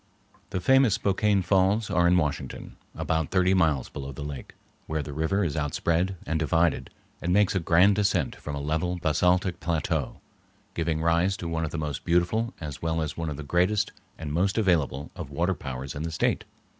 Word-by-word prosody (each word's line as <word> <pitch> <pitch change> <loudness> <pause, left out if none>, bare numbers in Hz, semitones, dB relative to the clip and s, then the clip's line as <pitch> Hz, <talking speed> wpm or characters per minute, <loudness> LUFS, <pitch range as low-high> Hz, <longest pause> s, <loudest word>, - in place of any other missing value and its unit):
The 95 - -2
famous 130 +1 +4
Spokane 100 0 +1
Falls 95 +3 +2
are 90 -1 +3
in 90 +1 +4
Washington, 75 -5 -3 0.2
about 80 -2 -1
thirty 95 -1 +3
miles 80 -8 +2
below 70 0 -7
the 70 - -7
lake, 70 -3 -7 0.3
where 80 -1 -2
the 70 - -7
river 80 +7 0
is 80 -4 -1
outspread 85 +5 0
and 80 +1 -1
divided 80 +2 +1 0.3
and 85 - -1
makes 105 +1 +3
a 95 - +1
grand 90 +4 +4
descent 105 -2 +1
from 75 - -6
a - - -4
level 80 +5 -1
basaltic 90 +2 +1
plateau, 80 -4 -2 0.5
giving 80 -1 -1
rise 85 +4 +2
to 85 - -5
one 80 0 -2
of - - -4
the 85 - -5
most 75 -2 -3
beautiful 90 +7 +1
as 75 -4 -7
well 80 0 -1
as 75 - -4
one 80 -1 -3
of 70 - -5
the 75 - -6
greatest 90 +7 +1 0.3
and 75 -2 -5
most 95 +6 +1
available 80 - +1
of - - -7
water - - 0
powers 65 +1 -6
in 70 - -5
the 80 +1 -3
State. 80 - 0
85 Hz, 195 wpm, -26 LUFS, 75-95 Hz, 0.5 s, famous